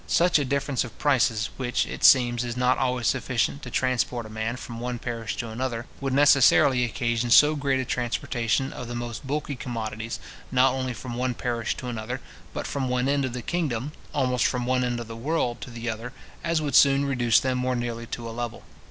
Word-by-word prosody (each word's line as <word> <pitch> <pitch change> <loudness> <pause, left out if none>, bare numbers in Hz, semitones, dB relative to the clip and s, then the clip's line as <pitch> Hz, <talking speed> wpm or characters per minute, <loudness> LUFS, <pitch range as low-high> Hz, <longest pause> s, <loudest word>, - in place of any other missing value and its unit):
Such 175 -2 +4
a 145 - 0
difference 140 -1 0
of 120 - -10
prices, 120 -6 +2
which, 125 -2 0
it - - -7
seems, 120 -2 +6
is 120 0 -4
not 125 0 +2
always 125 -2 0
sufficient 130 +3 0
to 125 - -7
transport 125 -1 0
a 110 - -10
man 110 +2 -2
from 120 -2 -8
one 125 0 -3
parish 115 -2 -4
to 115 - -4
another, 120 +1 -3
would 135 -1 -2
necessarily 140 -2 +5
occasion 120 0 -1
so 150 +5 +7
great 140 -2 0
a 130 - -1
transportation 120 +1 -1
of 125 - -7
the 120 - -5
most 120 +2 -5
bulky 145 0 -2
commodities, 115 -3 -5 0.3
not 130 0 +4
only 130 -2 -2
from 120 +2 -7
one 125 0 -1
parish 120 -2 -2
to 125 - -6
another, 120 +2 -4 0.3
but - - -5
from 135 -2 -2
one 125 +1 +1
end 140 -1 +2
of 130 - -4
the 125 -1 -5
kingdom, 145 -6 -2 0.2
almost 125 -3 +1
from 125 -1 -2
one 125 0 +1
end 120 -1 -1
of 120 - -6
the 115 - -7
world 120 -2 -1
to 115 - -7
the 120 0 -7
other, 115 +3 -4 0.3
as 165 -2 0
would 145 -2 -2
soon 140 +1 +6
reduce 120 -4 +3
them 130 -1 -1
more 125 0 0
nearly 120 -1 -4
to 120 -1 -5
a - - -5
level. 120 -1 -5
125 Hz, 215 wpm, -26 LUFS, 120-135 Hz, 0.3 s, so